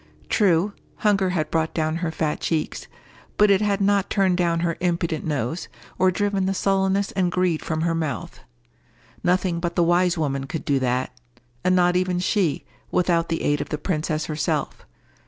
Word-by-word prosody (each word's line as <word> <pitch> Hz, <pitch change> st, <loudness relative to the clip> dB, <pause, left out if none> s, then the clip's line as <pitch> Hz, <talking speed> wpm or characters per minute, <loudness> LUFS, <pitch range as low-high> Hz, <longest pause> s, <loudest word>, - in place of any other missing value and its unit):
True, 195 Hz, 0 st, +3 dB, 0.3 s
hunger 195 Hz, -3 st, +3 dB
had 155 Hz, -4 st, -1 dB
brought 160 Hz, -1 st, 0 dB
down 155 Hz, 0 st, 0 dB
her 170 Hz, -1 st, -2 dB
fat 155 Hz, -1 st, -2 dB
cheeks, 160 Hz, -2 st, -2 dB, 0.5 s
but 210 Hz, -1 st, +5 dB
it 195 Hz, 0 st, +4 dB
had 205 Hz, -2 st, +1 dB
not 200 Hz, -1 st, +2 dB
turned 190 Hz, -3 st, +2 dB
down 170 Hz, -2 st, +1 dB
her 170 Hz, -1 st, 0 dB
impudent 170 Hz, -2 st, -1 dB
nose, 145 Hz, +2 st, -2 dB, 0.3 s
or 185 Hz, 0 st, +5 dB
driven 195 Hz, 0 st, 0 dB
the 195 Hz, -, 0 dB
sullenness 195 Hz, +1 st, +1 dB
and 185 Hz, -2 st, 0 dB
greed 180 Hz, -3 st, +1 dB
from 160 Hz, 0 st, -2 dB
her 165 Hz, 0 st, +1 dB
mouth. 155 Hz, -7 st, -3 dB, 0.8 s
Nothing 180 Hz, -1 st, +1 dB
but 170 Hz, 0 st, -3 dB
the 175 Hz, -, +3 dB
wise 175 Hz, +1 st, +3 dB
woman 140 Hz, -3 st, -1 dB
could 160 Hz, +4 st, -5 dB
do 140 Hz, -5 st, +2 dB
that—and 125 Hz, +3 st, -3 dB
not 180 Hz, 0 st, +3 dB
even 180 Hz, 0 st, +1 dB
she, 180 Hz, -3 st, 0 dB, 0.2 s
without 170 Hz, -2 st, +1 dB
the 165 Hz, -, -1 dB
aid 145 Hz, 0 st, +1 dB
of 145 Hz, -, -5 dB
the 150 Hz, -, -2 dB
princess 155 Hz, -1 st, -2 dB
herself. 155 Hz, -1 st, -2 dB
170 Hz, 175 wpm, -23 LUFS, 155-185 Hz, 0.8 s, but